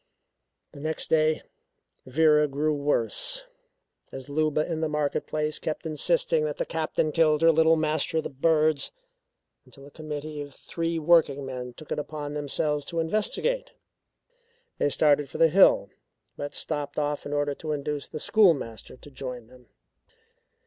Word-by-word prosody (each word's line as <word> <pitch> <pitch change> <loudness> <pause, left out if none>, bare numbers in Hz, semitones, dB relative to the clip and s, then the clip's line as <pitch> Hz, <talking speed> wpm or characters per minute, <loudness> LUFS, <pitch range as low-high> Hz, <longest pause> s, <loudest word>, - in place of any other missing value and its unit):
The 140 - -12
next 155 +2 -4
day 155 0 +3 0.6
Vera 150 +2 +4
grew 150 +2 0
worse, 145 - 0 0.7
as 135 +1 -8
Luba 155 +1 +1
in 160 -2 -3
the 160 - 0
market 150 -1 -1
place 155 0 -1
kept 155 +1 -4
insisting 485 - +1
that - - -3
the - - -1
Captain 155 - -1
killed 155 -1 +3
her 165 - +7
Little 160 +1 +4
Master 155 0 0
of 160 - +1
the - - -5
Birds; 155 +2 +2 0.7
until 140 -1 -15
a 145 - -14
committee 150 -1 -6
of 145 -1 -9
three 165 0 -3
working 155 -4 +3
men 125 -2 -6
took 155 - -13
it - - -1
upon 145 -1 -5
themselves 150 0 -1
to 170 - -3
investigate. 465 - -1 1.1
They - - +2
started 145 -1 +3
for - - -7
the 165 - +5
hill, 160 - +5 0.4
but 145 - -6
stopped 145 -2 -3
off 145 -1 -2
in - - -6
order 145 0 0
to 155 +2 -6
induce 145 -1 -3
the - - -7
schoolmaster 145 - +2
to 145 - -14
join 125 -3 -7
them. 125 +1 -19
150 Hz, 155 wpm, -26 LUFS, 145-160 Hz, 1.1 s, her